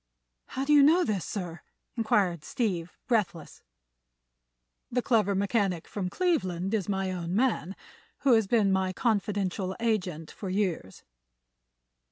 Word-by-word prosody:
"How 270 - -3
do 300 - +3
you 290 - +8
know 325 +6 +6
this, 205 - -1
sir?" 175 -4 -5 0.3
inquired 195 -8 +1
Steve, 180 -5 -2
breathless. 210 - -1 1.3
"The 250 0 -1
clever 210 -5 +2
mechanic 195 -3 0
from 190 -3 -3
Cleveland 195 - 0
is 205 -3 -1
my 195 -1 -1
own 175 0 -3
man, 210 - 0 0.5
who 275 -3 +4
has 220 -3 +3
been 210 -3 +3
my 190 -1 +1
confidential 200 -4 -1
agent 185 -9 -1
for 195 - -6
years." 185 - -2
195 Hz, 130 wpm, -28 LUFS, 180-230 Hz, 1.3 s, you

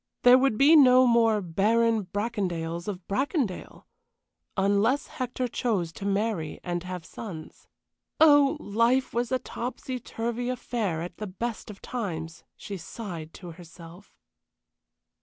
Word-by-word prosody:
There 250 +1 +8
would 265 -5 +2
be 295 +6 +6
no 255 -3 +7
more 230 -3 +3
Baron 220 +5 +2
Bracondales 180 -5 -3
of 185 -4 -6
Bracondale, 260 - -2 0.7
unless 205 +7 +2
Hector 255 -3 -3
chose 205 -9 -1
to 200 - -5
marry 200 -6 -1
and 175 -1 -2
have 180 -2 -7
sons. 170 -5 -9 0.5
Oh, 290 -1 +6
life 235 +3 +1
was 240 +1 -1
a 260 - +3
topsy 255 +1 -5
turvy 235 +1 -4
affair 220 -9 -2
at 175 0 -8
the 215 - -5
best 225 +5 -5
of 205 - -11
times, 165 -10 -5
she 200 -1 -7
sighed 170 -3 -7
to 175 -3 -9
herself. 170 +2 -14
215 Hz, 130 wpm, -27 LUFS, 180-245 Hz, 0.7 s, There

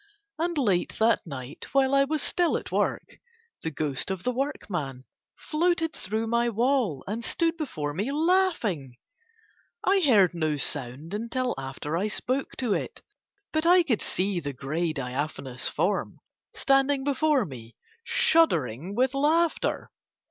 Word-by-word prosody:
And 340 0 -1
late 200 -10 +1
that 225 -4 +2
night 135 -1 -7
while 270 0 +3
I 275 0 +5
was 305 +1 -1
still 350 -2 +2
at - - -8
work, - - 0 0.6
the 160 - -2
ghost 145 -1 -2
of 190 -2 -3
the 250 - +1
workman 175 - -3 0.3
floated 325 0 0
through 220 +4 -2
my 235 +1 +1
wall 235 - +1
and 220 +4 -4
stood 330 +7 +1
before 155 - -4
me 205 - -2
laughing. 300 - +1 0.9
I 390 0 +4
heard 215 - +5
no 155 -3 0
sound 140 +4 -1
until 240 +4 -1
after 135 +3 -5
I 190 +5 0
spoke 255 +5 -2
to 240 -5 0
it; - - -4 0.5
but 315 +1 +1
I 355 0 +7
could 245 -10 0
see 190 0 -1
the 145 -3 -5
grey 155 +6 -2
diaphanous 135 -1 -3
form - - -1 0.4
standing 275 0 +2
before 285 -2 +2
me 120 -7 -10 0.3
shuddering 175 - +2
with 255 +3 +2
laughter. 315 +4 +1
225 Hz, 140 wpm, -27 LUFS, -, 0.9 s, I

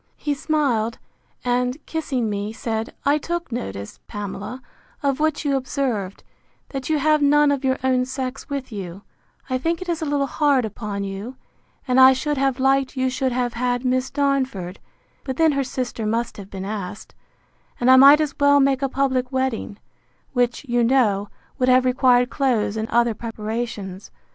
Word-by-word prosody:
He 295 - -1
smiled, 275 -7 0 0.5
and, 250 +1 +1
kissing 270 -7 -2
me, 205 0 -3
said, 225 0 -4
I 290 +2 +3
took 340 0 -4
notice, 100 - -5
Pamela, 205 +5 -6 0.4
of 280 0 +1
what 310 0 0
you 280 -1 +2
observed, 255 -8 -2 0.5
that 270 0 -5
you 310 - +2
have 305 +1 +3
none 290 0 +4
of 280 -1 -1
your 260 0 +1
own 255 -1 +2
sex 260 +1 -5
with 275 -3 -4
you; 195 -2 -7 0.4
I 255 -1 -1
think 330 +4 -1
it 370 - -7
is 335 -2 -2
a - - -1
little 285 -1 +1
hard 280 -3 +2
upon 210 -1 -5
you; 200 +6 -6 0.5
and 255 +1 +3
I 260 0 +9
should 295 +3 -2
have 270 -1 +1
liked 270 0 +2
you 260 0 +1
should 260 0 -1
have 245 -1 -1
had 245 +1 -1
Miss 255 +1 +1
Darnford; 265 -10 -1 0.4
but 260 -1 -4
then 320 -1 +4
her 275 -1 0
sister 250 -4 -3
must 230 +2 -1
have 200 -2 -9
been 190 -1 -6
asked; 200 -1 -6 0.7
and 245 +1 +4
I - - +9
might 280 +3 +9
as 305 -2 0
well 285 0 +5
make 270 -1 +2
a 275 - 0
public 260 -1 0
wedding: 260 -6 -2 0.6
which, 245 +1 0
you 240 -1 +2
know, 220 -5 +2 0.3
would 255 0 +2
have 255 0 +5
required 250 -1 +3
clothes 245 -7 +1
and 220 0 -3
other 235 0 +2
preparations. 215 -3 -5
255 Hz, 175 wpm, -22 LUFS, 225-275 Hz, 0.7 s, I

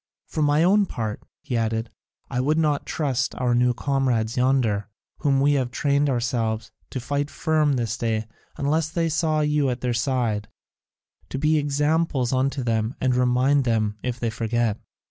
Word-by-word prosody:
For 155 - -3
my 150 +2 +3
own 200 +3 +4
part," 110 -7 -4 0.2
he 125 - -3
added, 115 0 -1 0.4
"I 125 - -2
would 150 +4 +1
not 150 -3 +1
trust 135 -4 -1
our 125 -1 0
new 125 0 +3
comrades 125 -5 0
yonder, 125 -5 +1 0.3
whom 140 -3 +2
we 145 +2 +4
have 130 -3 0
trained 140 +3 +1
ourselves, 115 -3 -1 0.2
to 130 - -4
stand 145 +3 -2
firm 155 -3 +1
this 120 -2 -2
day 110 -1 -1 0.3
unless 155 +3 0
they 165 0 0
saw 155 -1 +1
you 150 -2 +2
at 125 -1 -3
their 125 -1 0
side, 115 -4 0 0.8
to - - -4
be 155 +2 +2
examples 145 -2 +1
unto 135 +1 0
them 115 +1 0
and 130 -1 +1
to 125 - +1
remind 130 +3 +3
them 110 -3 0
if 125 -1 -3
they 115 -2 -1
forget. 115 -1 -1
130 Hz, 170 wpm, -24 LUFS, 115-145 Hz, 0.8 s, own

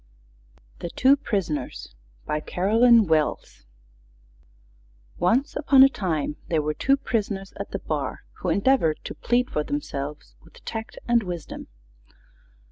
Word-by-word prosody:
'" - - -31
THE 170 - -5
TWO 265 +9 +4
PRISONERS 155 - -3 0.3
BY 150 - -1
CAROLYN 225 +7 +4
WELLS 155 - -1 1.5
Once 245 - +1
upon 270 -2 +6
a 270 - +7
time 160 - -2
there 160 - +1
were 150 0 -1
two 275 - +2
Prisoners 205 -7 -3
at - - -5
the - - -3
bar, - - -4 0.2
who - - -2
endeavored 200 - +2
to - - -6
plead 245 +1 0
for 150 - 0
themselves 145 0 -5
with 165 - -19
Tact 225 0 -6
and 235 -1 +4
Wisdom. 175 -5 -6
185 Hz, 130 wpm, -24 LUFS, 150-235 Hz, 1.5 s, a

